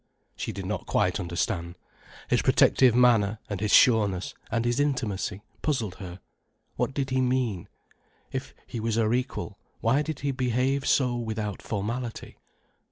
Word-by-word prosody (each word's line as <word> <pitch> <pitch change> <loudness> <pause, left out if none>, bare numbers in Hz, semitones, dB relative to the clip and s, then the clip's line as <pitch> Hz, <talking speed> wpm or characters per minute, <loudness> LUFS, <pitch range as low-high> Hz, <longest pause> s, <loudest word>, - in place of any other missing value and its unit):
She - - -4
did - - -6
not - - -4
quite - - +1
understand. 85 0 -2 0.5
His - - +2
protective 125 -3 +5
manner, 115 -4 +4
and 100 -3 -4
his 105 -1 0
sureness, 105 -7 +4 0.2
and 115 0 0
his 120 +2 +1
intimacy, 105 -8 -1 0.2
puzzled 115 - -1
her. 90 -2 -8 0.6
What 135 - -1
did 135 -2 -2
he 130 0 +2
mean? 125 -8 0 0.6
If 135 0 -5
he 120 - -6
was 110 0 -1
her 115 0 +2
equal, 125 -5 -3 0.2
why 125 +6 +2
did 155 -1 -4
he 140 0 0
behave 130 +2 0
so 125 -3 +3
without 110 -3 -3
formality? 115 +3 -4
115 Hz, 150 wpm, -27 LUFS, 105-130 Hz, 0.6 s, protective